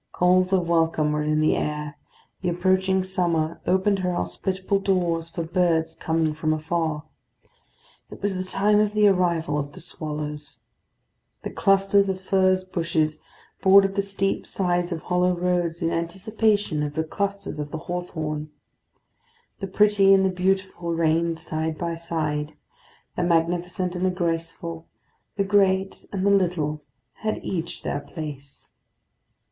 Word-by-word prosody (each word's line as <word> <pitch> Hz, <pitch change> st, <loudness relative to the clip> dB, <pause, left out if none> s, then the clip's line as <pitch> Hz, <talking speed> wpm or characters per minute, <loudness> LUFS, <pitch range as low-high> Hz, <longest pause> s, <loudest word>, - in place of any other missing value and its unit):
Calls 185 Hz, +1 st, +3 dB
of 180 Hz, -3 st, +2 dB
welcome 160 Hz, -2 st, +2 dB
were 150 Hz, 0 st, 0 dB
in 155 Hz, 0 st, +1 dB
the 155 Hz, -, +3 dB
air; 150 Hz, -1 st, -3 dB, 0.5 s
the 180 Hz, -, 0 dB
approaching 190 Hz, +2 st, +2 dB
summer 170 Hz, -3 st, 0 dB
opened 190 Hz, +2 st, +2 dB
her 180 Hz, -1 st, -1 dB
hospitable 185 Hz, -, -1 dB
doors 175 Hz, -4 st, 0 dB
for 170 Hz, 0 st, -4 dB
birds 165 Hz, -2 st, +1 dB
coming 160 Hz, -1 st, 0 dB
from 155 Hz, +1 st, 0 dB
afar. 155 Hz, -1 st, -1 dB, 1.1 s
It -, -, -10 dB
was 200 Hz, 0 st, -1 dB
the 185 Hz, 0 st, -2 dB
time 210 Hz, +1 st, +3 dB
of 210 Hz, -1 st, +2 dB
the 210 Hz, -1 st, +5 dB
arrival 170 Hz, -6 st, +1 dB
of 145 Hz, 0 st, -5 dB
the -, -, -10 dB
swallows. 150 Hz, -5 st, -5 dB, 0.8 s
The -, -, -4 dB
clusters 195 Hz, 0 st, +3 dB
of 190 Hz, -1 st, -2 dB
furze 185 Hz, -1 st, +2 dB
bushes 165 Hz, -4 st, -1 dB, 0.4 s
bordered 195 Hz, 0 st, +6 dB
the 200 Hz, -, +1 dB
steep 195 Hz, 0 st, -2 dB
sides 175 Hz, -1 st, 0 dB
of 165 Hz, -2 st, -4 dB
hollow 180 Hz, 0 st, +2 dB
roads 175 Hz, -1 st, -1 dB
in 165 Hz, -, +1 dB
anticipation 195 Hz, 0 st, 0 dB
of 145 Hz, 0 st, -3 dB
the 160 Hz, -, +1 dB
clusters 200 Hz, +1 st, -3 dB
of 145 Hz, -1 st, -4 dB
the 160 Hz, -, -4 dB
hawthorn. 155 Hz, -4 st, -4 dB, 1.1 s
The 195 Hz, -, -4 dB
pretty 195 Hz, 0 st, +5 dB
and 190 Hz, 0 st, +3 dB
the -, -, +3 dB
beautiful 185 Hz, -2 st, -1 dB
reigned 165 Hz, 0 st, +1 dB
side 160 Hz, 0 st, -3 dB
by 170 Hz, 0 st, -2 dB
side; 155 Hz, -2 st, -3 dB, 0.6 s
the -, -, -1 dB
magnificent 175 Hz, +1 st, 0 dB
and 180 Hz, -, -2 dB
the 185 Hz, -, +3 dB
graceful, 165 Hz, -1 st, -3 dB, 0.5 s
the 200 Hz, -, +2 dB
great 195 Hz, -1 st, +1 dB
and 195 Hz, -1 st, -2 dB
the 200 Hz, -, +4 dB
little, 170 Hz, -6 st, +1 dB, 0.4 s
had 215 Hz, 0 st, -2 dB
each 170 Hz, -2 st, -4 dB
their -, -, -2 dB
place. 145 Hz, -2 st, -8 dB
175 Hz, 145 wpm, -24 LUFS, 160-190 Hz, 1.1 s, bordered